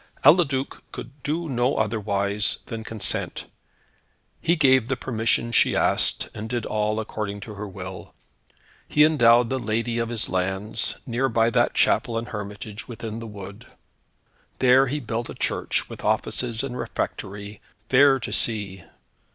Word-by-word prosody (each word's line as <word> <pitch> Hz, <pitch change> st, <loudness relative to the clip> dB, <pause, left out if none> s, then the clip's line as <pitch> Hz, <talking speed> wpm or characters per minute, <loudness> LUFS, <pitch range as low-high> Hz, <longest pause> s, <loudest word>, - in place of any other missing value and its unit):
Eliduc 140 Hz, -6 st, +4 dB
could 135 Hz, +4 st, -9 dB
do 165 Hz, +4 st, -2 dB
no 125 Hz, 0 st, +1 dB
otherwise 105 Hz, -1 st, 0 dB
than 115 Hz, -1 st, -6 dB
consent. 110 Hz, -1 st, -2 dB, 1.0 s
He 170 Hz, -, +3 dB
gave 130 Hz, -6 st, +4 dB
the -, -, -1 dB
permission 115 Hz, -1 st, 0 dB
she -, -, +3 dB
asked, -, -, +2 dB
and 110 Hz, +1 st, -6 dB
did 120 Hz, -2 st, -2 dB
all 105 Hz, 0 st, 0 dB
according 105 Hz, -2 st, -4 dB
to 105 Hz, +2 st, -8 dB
her 105 Hz, +1 st, -6 dB
will. 95 Hz, -1 st, -9 dB, 0.7 s
He 150 Hz, 0 st, +5 dB
endowed 120 Hz, -6 st, +5 dB
the 130 Hz, -, 0 dB
lady 115 Hz, +1 st, -1 dB
of 115 Hz, 0 st, -1 dB
his 115 Hz, -2 st, 0 dB
lands, 95 Hz, +4 st, -1 dB
near 130 Hz, +2 st, 0 dB
by 115 Hz, 0 st, +2 dB
that -, -, +2 dB
chapel 115 Hz, -, +2 dB
and 115 Hz, +1 st, -4 dB
hermitage, 105 Hz, 0 st, -7 dB
within 115 Hz, -2 st, -6 dB
the 115 Hz, -, -7 dB
wood. 100 Hz, -1 st, -10 dB, 0.9 s
There 130 Hz, +1 st, +5 dB
he 145 Hz, +4 st, -2 dB
built 115 Hz, -2 st, -4 dB
a -, -, -7 dB
church -, -, -1 dB
with -, -, -10 dB
offices 120 Hz, -1 st, 0 dB
and 130 Hz, -3 st, -4 dB
refectory, 100 Hz, -3 st, -5 dB, 0.3 s
fair 135 Hz, +1 st, +5 dB
to -, -, -4 dB
see. 100 Hz, -5 st, 0 dB
115 Hz, 150 wpm, -24 LUFS, 105-125 Hz, 1.0 s, He